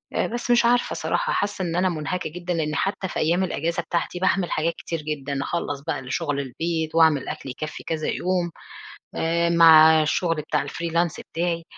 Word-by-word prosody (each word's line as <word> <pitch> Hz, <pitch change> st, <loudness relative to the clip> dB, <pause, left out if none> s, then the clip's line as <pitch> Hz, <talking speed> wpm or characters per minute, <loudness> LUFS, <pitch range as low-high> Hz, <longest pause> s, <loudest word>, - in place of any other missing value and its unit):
آآ -, -, +1 dB
بس 240 Hz, +1 st, -3 dB
مش 240 Hz, 0 st, +4 dB
عارفة 240 Hz, +1 st, +2 dB
صراحة -, -, -1 dB
حاسّة 200 Hz, -1 st, -1 dB
إن 170 Hz, -1 st, -3 dB
أنا 185 Hz, +1 st, +2 dB
مُنهكة 170 Hz, +2 st, -3 dB
جدًا، 175 Hz, +2 st, -4 dB
لأني 155 Hz, -2 st, -1 dB
حتّى 195 Hz, -1 st, -1 dB
في -, -, -4 dB
أيّام 170 Hz, +4 st, +2 dB
الإجازة 170 Hz, -1 st, -1 dB
بتاعتي، 175 Hz, +1 st, -2 dB
باعمل 185 Hz, -1 st, +1 dB
حاجات 165 Hz, +2 st, 0 dB
كتير 165 Hz, -1 st, -5 dB
جدًا، 145 Hz, -2 st, -3 dB
أخلّص 145 Hz, -5 st, -3 dB
بقى 145 Hz, -, -1 dB
الشغل 135 Hz, +2 st, -2 dB
البيت، 160 Hz, +4 st, -3 dB
وأعمل 160 Hz, -4 st, +4 dB
أكل 135 Hz, -, -6 dB
يكفّي 155 Hz, +4 st, -6 dB
كذا 160 Hz, -2 st, -3 dB
يوم، 180 Hz, -1 st, -1 dB, 0.6 s
آآ 170 Hz, +1 st, +1 dB
مع 160 Hz, -1 st, +7 dB
الشغل 165 Hz, +2 st, 0 dB
بتاع 150 Hz, -, -2 dB
الfreelance 170 Hz, 0 st, -1 dB
بتاعي، 170 Hz, 0 st, -1 dB
165 Hz, 180 wpm, -24 LUFS, 155-175 Hz, 0.6 s, مع